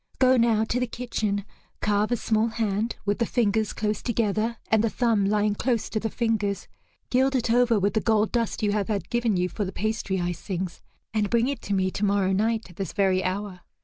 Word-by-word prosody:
Go 260 0 +5
now 230 -3 +3
to 230 +2 -1
the 250 - 0
kitchen, 215 -4 -2 0.3
carve 210 +1 +1
a 240 - +2
small 220 0 +1
hand 225 -1 -1
with 205 +2 0
the 235 - +2
fingers 220 -3 +1
close 210 0 -2
together 225 -1 0
and 220 -1 +4
the 230 - +2
thumb 225 -4 +1
lying 210 +1 +2
close 230 +1 -1
to 215 - 0
the 225 - -2
fingers, 215 -3 -1 0.4
gild 265 +2 +3
it 240 -2 +1
over 240 -1 +4
with 200 +1 +1
the 220 - +1
gold 220 -1 +2
dust 230 -2 -1
you 205 - +2
have 205 -2 0
had 205 -3 -3
given 235 -4 +1
you 180 0 +1
for 205 - -3
the 190 - -4
pastry 215 -2 -2
icings, 175 0 -3 0.3
and 210 -2 +1
bring 235 +1 +2
it 280 -3 -3
to 200 - -2
me 185 -1 +1
tomorrow 200 -1 +1
night 220 +3 0
at 175 - -19
this 195 -5 -4
very 190 -2 +2
hour." 190 0 -3
215 Hz, 215 wpm, -26 LUFS, 200-230 Hz, 0.4 s, Go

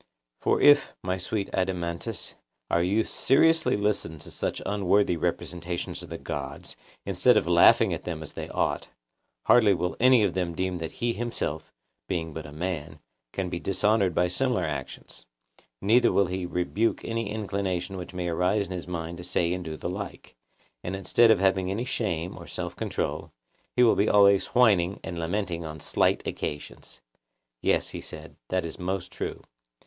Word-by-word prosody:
For - - +1
if, 145 0 +5
my 95 0 -1
sweet 100 +2 -2
Adeimantus, 90 -2 -2 0.4
our 85 - +3
youth 100 +6 +1
seriously 160 0 +3
listen 100 -6 -1
to 75 - -9
such - - -3
unworthy 100 -2 +2
representations 85 +2 -3
of - - -9
the - - -5
gods, 70 -2 -6 0.3
instead - - +4
of - - +2
laughing - - +5
at - - -5
them 80 -3 -5
as 75 - -8
they - - -6
ought, - - -1 0.6
hardly 110 -5 +6
will 90 +1 -2
any 125 -2 +6
of 100 - +1
them 90 -2 -2
deem 90 0 -2
that 80 -1 -5
he 120 0 -1
himself, 80 -11 -3 0.4
being 80 -4 -3
but 80 -1 -6
a - - -11
man, 80 -1 -4 0.3
can 95 -1 -2
be 85 -1 -4
dishonoured 100 -1 +2
by 90 - +3
similar 125 +7 +1
actions; 70 -4 -6 0.6
neither 115 +5 +5
will 100 - +3
he 90 0 -3
rebuke 90 +6 -1
any 115 -2 -2
inclination 95 -3 -2
which 90 -2 -7
may 90 -1 -3
arise 90 +5 +1
in 95 - -11
his 90 -2 -5
mind 85 -1 -5
to - - -7
say 85 -1 0
and 90 0 -4
do 80 -2 -6
the - - -4
like. 100 +3 -7 0.5
And 90 - -3
instead 100 +5 +4
of 110 - +6
having 95 -1 +2
any 105 +6 -2
shame 90 -9 -2
or - - -11
self - - -5
control, - - -3 0.4
he 125 - +5
will 115 - +6
be 100 - +2
always 100 -1 +5
whining 100 -7 +3
and 85 - -5
lamenting 85 0 -2
on 80 -1 -7
slight - - +1
occasions. 75 0 -6 0.6
Yes, - - +2
he - - -6
said, - - -9
that 90 -2 0
is 80 - -7
most 95 0 -3
true. - - -5
90 Hz, 175 wpm, -27 LUFS, 85-105 Hz, 0.6 s, hardly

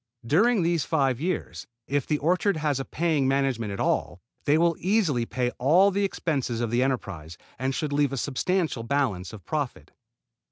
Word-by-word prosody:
During 200 - +3
these 170 -3 +1
five 135 -5 0
years, 180 +3 -3 0.2
if 145 -1 -1
the 150 - +1
orchard 180 +5 +1
has 150 -3 0
a 135 - -3
paying 155 -5 0
management 135 -5 0
at 100 - -5
all, 85 - 0 0.3
they 145 +2 +4
will 170 0 +3
easily 175 - +1
pay 125 +1 -1
all 175 +10 +5
the 200 +1 0
expenses 140 -11 -1
of 120 -2 -1
the 120 +1 +2
enterprise, 100 - -3 0.2
and 130 +1 -1
should 150 -3 -2
leave 145 -2 +2
a 135 - -3
substantial 155 +2 -1
balance 115 -7 -1
of 110 -3 -11
profit. 145 -5 -4
140 Hz, 175 wpm, -26 LUFS, 125-165 Hz, 0.3 s, all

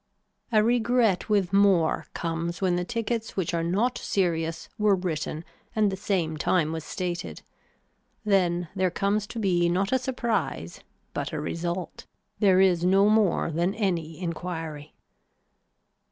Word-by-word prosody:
A 215 -2 +4
regret 235 -4 +2
with 200 -3 +1
more 195 -5 +3
comes 170 +1 -3
when 185 -2 +1
the 180 - 0
tickets 230 +2 -3
which 180 -3 -1
are 170 - +1
not 200 +9 0
serious 165 -3 -1
were 210 -1 +4
written 165 -3 -3 0.3
and 210 -2 +3
the - - -2
same 185 -5 -1
time 155 0 +1
was 160 -1 -4
stated. 175 +1 -4 0.8
Then 175 -4 +2
there 185 -1 +2
comes 200 +3 0
to 230 - -8
be 175 -5 +2
not 190 +3 0
a 260 - +3
surprise 235 - -2 0.3
but - - -3
a - - -2
result. 175 +1 -4 0.3
There 190 -3 +5
is 180 -3 +4
no 195 +3 +4
more 210 -6 +2
than 175 +5 0
any 170 -6 -2
enquiry. 165 -4 -5
185 Hz, 140 wpm, -26 LUFS, 170-205 Hz, 0.8 s, There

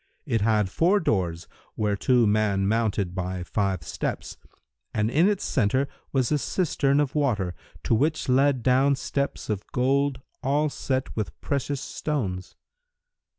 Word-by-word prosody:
It 115 - 0
had 105 -1 +2
four 185 +5 +3
doors, 90 - -1 0.3
whereto 110 +4 +2
man 105 -2 +2
mounted 105 -4 0
by 90 -1 -3
five 95 -3 -1
steps, - - -4 0.6
and 110 +1 +1
in 165 +8 +4
its 205 -2 -1
centre 130 +2 +1 0.2
was 130 -1 +1
a 150 - +2
cistern 140 -4 +1
of 145 -3 0
water, 110 - 0 0.3
to - - +1
which 150 +8 +1
led 130 -1 +3
down 130 +3 +4
steps 140 +1 -3
of 105 -2 -2
gold 135 +2 +1 0.2
all 145 +3 +1
set 130 -1 -2
with 105 -8 -4
precious 140 0 -2
stones. 100 -16 -3
125 Hz, 140 wpm, -25 LUFS, 100-140 Hz, 0.6 s, in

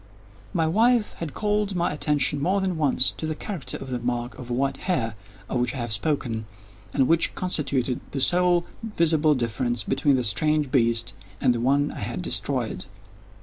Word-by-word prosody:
My 165 -5 +1
wife 225 +6 +3
had 165 -4 -5
called 210 -2 0
my 175 -3 +1
attention, 145 -1 +1
more 185 +6 +2
than 190 -2 -1
once, 145 -5 +4
to 160 - -3
the 155 - -2
character 160 - -5
of 130 - -8
the 125 - -2
mark 120 0 -3
of 125 -1 -9
white 135 +3 0
hair, 115 - 0 0.3
of 125 - -1
which 125 +2 -1
I - - -4
have 120 -3 -2
spoken, 115 -2 -2 0.4
and 130 +2 +2
which 165 +1 +2
constituted 140 -8 0
the 140 - -4
sole 175 +3 +3 0.3
visible 155 -2 +4
difference 120 -1 -1
between 140 +6 +2
the 125 - 0
strange 150 +6 +1
beast 115 -2 +2 0.3
and 125 - +3
the 120 - -2
one 140 +4 +2
I - - -8
had - - -4
destroyed. - - -1
145 Hz, 180 wpm, -25 LUFS, 120-165 Hz, 0.4 s, once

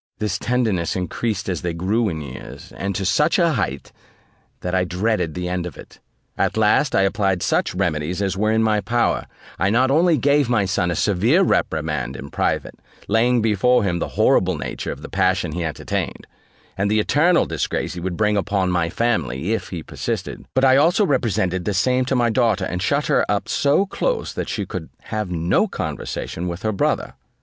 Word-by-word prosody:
This 105 -2 -2
tenderness 110 -9 0
increased 100 +3 -2
as 90 -4 -2
they 85 -2 -3
grew 105 +6 +1
in 80 -3 -4
years, 65 -3 -9
and 100 0 -3
to 95 - -2
such 150 - +3
a 170 -3 +3
height, 95 - -3 0.7
that 90 - -3
I 95 -1 +3
dreaded 90 -2 -1
the 90 0 -3
end 90 -1 -2
of 90 - -10
it. - - -13 0.4
At - - +1
last, - - +3
I 100 - +4
applied 95 -2 +1
such - - 0
remedies 85 -2 -1
as 95 -2 -1
were 110 +3 +1
in 110 0 +2
my 105 -1 +2
power: 120 +2 0 0.3
I 95 - +2
not 130 +5 +3
only 165 +2 +4
gave 145 -2 +2
my 110 -5 +2
son 95 -1 0
a 85 - -1
severe 110 - +3
reprimand 75 - 0
in 70 +1 -8
private, - - -2 0.3
laying 115 +2 +3
before 115 +3 +3
him 90 -3 0
the - - -2
horrible - - +3
nature - - -4
of - - -8
the - - -6
passion 95 -3 +1
he 85 +2 -3
entertained, 80 -2 -3 0.5
and 100 +1 0
the 110 +1 +2
eternal 160 +10 +3
disgrace 80 -3 -2
he 90 - -6
would 90 0 -4
bring 105 -1 +2
upon 95 -2 0
my 85 -2 +1
family, 90 - -1
if 115 - -3
he 85 -4 -5
persisted; - - -5
but 130 +1 +4
I 130 0 +6
also 170 +8 +4
represented 105 - 0
the 105 - -1
same 125 +6 +2
to 130 - 0
my 120 -2 +2
daughter, 110 -6 +2
and 90 0 -3
shut 140 +10 +1
her - - +3
up 105 0 0
so 145 +7 +2
close - - -2
that - - -4
she - - -2
could - - -6 0.2
have 105 -3 -2
no 85 0 +1
conversation 90 +2 -4
with 85 +1 -5
her 110 - +1
brother. 100 - -1
100 Hz, 195 wpm, -21 LUFS, 90-120 Hz, 0.7 s, I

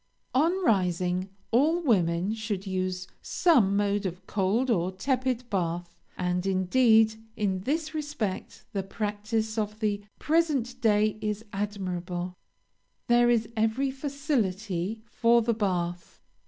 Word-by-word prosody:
On 340 +8 +2
rising, 180 - +1 0.2
all 300 +9 +4
women 190 - +2
should 215 -3 -3
use 185 -1 -2
some 235 - +3
mode 205 -1 +1
of 180 +1 -8
cold 215 +7 +1
or 180 -3 +1
tepid 255 +4 -1
bath; 175 -2 -2 0.2
and, 180 0 0
indeed, 220 +4 +4 0.2
in 195 -3 0
this 310 - -2
respect 295 -11 -4
the 200 - 0
practice 215 +2 -2
of 210 0 -3
the 205 -2 0 0.2
present 290 -6 +1
day 215 -1 +3
is 210 +1 -3
admirable; 185 -3 -3 0.8
there 240 0 +5
is 230 -2 +2
every 225 +5 +1
facility 220 - -2
for 235 0 +3
the 235 +1 +2
bath. 175 -5 -2
210 Hz, 120 wpm, -28 LUFS, 185-240 Hz, 0.8 s, there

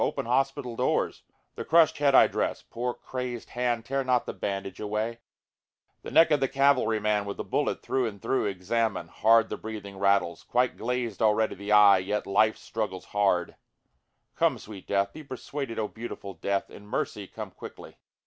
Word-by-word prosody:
open - - -1
hospital 135 0 0
doors!) - - 0 0.3
The - - -6
crushâd 160 -1 +4
head 140 -2 +3
I - - +9
dress, - - -2
(poor 120 +1 -4
crazed 125 -2 -6
hand 120 -2 -1
tear 135 +1 -1
not 125 -2 +1
the - - -5
bandage 95 -1 -4
away,) 110 +2 -2 0.8
The - - -7
neck 165 - +5
of 150 - +4
the 135 - +1
cavalry 135 -5 +2
man 105 -1 +1
with 100 - -5
the - - -3
bullet - - -1
through 130 -2 0
and 100 -2 -7
through 130 - 0
examine, 100 -1 -1
Hard 115 +3 +4
the - - -4
breathing 100 -3 -8
rattles, 100 -3 +2
quite 125 +1 0
glazed 120 -3 -3
already 110 0 +3
the 100 +1 -6
eye, 105 -2 +7
yet 105 +3 -2
life 110 +2 +3
struggles 105 -4 -4
hard, 95 -4 0 0.8
(Come - - +2
sweet 100 -3 -11
death! 100 0 0
be 155 - -9
persuaded 135 -2 -6
O 110 - -1
beautiful 110 -4 -8
death! 100 +3 -2
In 105 - -13
mercy 105 -1 -3
come - - -8
quickly.) - - -11
110 Hz, 175 wpm, -27 LUFS, 100-125 Hz, 0.8 s, I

